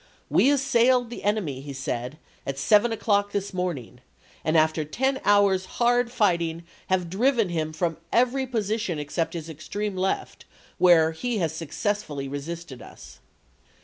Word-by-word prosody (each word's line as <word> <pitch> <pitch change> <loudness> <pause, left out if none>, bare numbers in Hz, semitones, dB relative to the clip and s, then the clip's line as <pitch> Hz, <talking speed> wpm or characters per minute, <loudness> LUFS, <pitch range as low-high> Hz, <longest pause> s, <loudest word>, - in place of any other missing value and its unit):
" - - -37
We 270 - +6
assailed 250 -3 +3
the - - -7
enemy," 195 -11 -1
he 140 0 -7
said, 130 +1 -4 0.3
"at 135 0 -3
seven 210 +10 +4
o'clock 205 -2 +1
this 200 0 -2
morning, 170 -10 -4 0.4
and 155 +1 +2
after 155 0 +2
ten 265 - -1
hours' 200 -2 +4
hard 240 0 +2
fighting 170 -7 +1 0.2
have 185 -2 +1
driven 225 +3 +2
him 160 -2 -2
from 165 +1 -2
every 255 +3 +2
position 215 -6 -1
except 150 +4 -2
his 165 -2 -5
extreme 195 +6 -4
left, 190 +1 -2 0.3
where 165 -3 +6
he 235 +8 -3
has 165 -5 -1
successfully 160 -2 -3
resisted 145 -1 -6
us." - - -13
185 Hz, 145 wpm, -25 LUFS, 155-225 Hz, 0.4 s, We